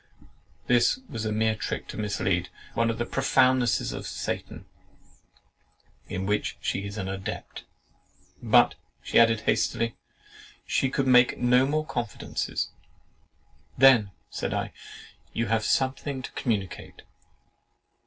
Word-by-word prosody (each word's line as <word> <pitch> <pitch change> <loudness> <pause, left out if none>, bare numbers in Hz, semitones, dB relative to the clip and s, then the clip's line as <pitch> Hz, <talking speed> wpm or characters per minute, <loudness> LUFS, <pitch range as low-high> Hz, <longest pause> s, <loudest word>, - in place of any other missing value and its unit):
This 120 - +3
was 115 -3 -5
a 110 - -1
mere 110 +1 +2
trick 110 - -4
to - - -6
mislead; 95 -4 -1 0.2
one 115 0 +1
of 115 - -2
the 120 - -1
profoundnesses 130 -2 +2
of - - -6
Satan, - - -5 1.4
in 95 +1 -4
which 105 +1 -1
she 100 - -2
is 100 +1 -7
an 95 -3 -3
adept. 95 0 -6 0.8
"But," - - +5 0.3
she - - +3
added 115 -2 +5
hastily, 115 +1 0 0.7
"she 135 - +1
could 135 +1 0
make 125 -1 +5
no 125 +2 +4
more 155 +2 0
confidences." 120 -7 -3 1.1
"Then," 125 -7 +6 0.2
said - - -3
I, - - -3 0.6
"you 115 -1 -1
have 110 -1 +1
something 130 +2 0
to - - -7
communicate." 100 -8 -3
115 Hz, 125 wpm, -27 LUFS, 105-130 Hz, 1.4 s, Then